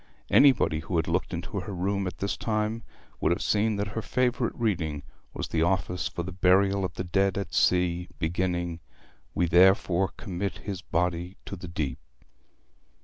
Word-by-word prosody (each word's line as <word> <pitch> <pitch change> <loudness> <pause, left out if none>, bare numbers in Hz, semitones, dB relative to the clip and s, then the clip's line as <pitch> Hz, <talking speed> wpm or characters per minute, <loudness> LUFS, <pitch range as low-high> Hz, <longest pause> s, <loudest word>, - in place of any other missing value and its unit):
Anybody 130 - +5
who 85 +3 -4
had 80 -1 +1
looked 85 +3 0
into 90 +4 -4
her 95 +3 -6
room 100 +2 -1
at 90 - -6
this 100 - -2
time 110 0 -1 0.4
would 80 - +2
have 85 - 0
seen 105 +1 +2
that 100 +1 -2
her 110 +2 -3
favourite 125 0 0
reading 85 -10 -1 0.3
was - - -4
the 80 - 0
office 90 0 0
for 85 - -4
the 95 - -6
Burial 95 +2 +3
of 90 -3 -3
the - - -3
Dead 95 +1 +1
at 100 - -4
Sea, 90 -1 +2
beginning 85 0 -1 0.6
'We 90 - +2
therefore 95 +1 +5
commit 100 -1 -4
his 95 -3 -4
body 90 +1 -1
to - - -6
the 90 -1 -8
deep.' 75 -7 -3
90 Hz, 170 wpm, -27 LUFS, 85-100 Hz, 0.6 s, Anybody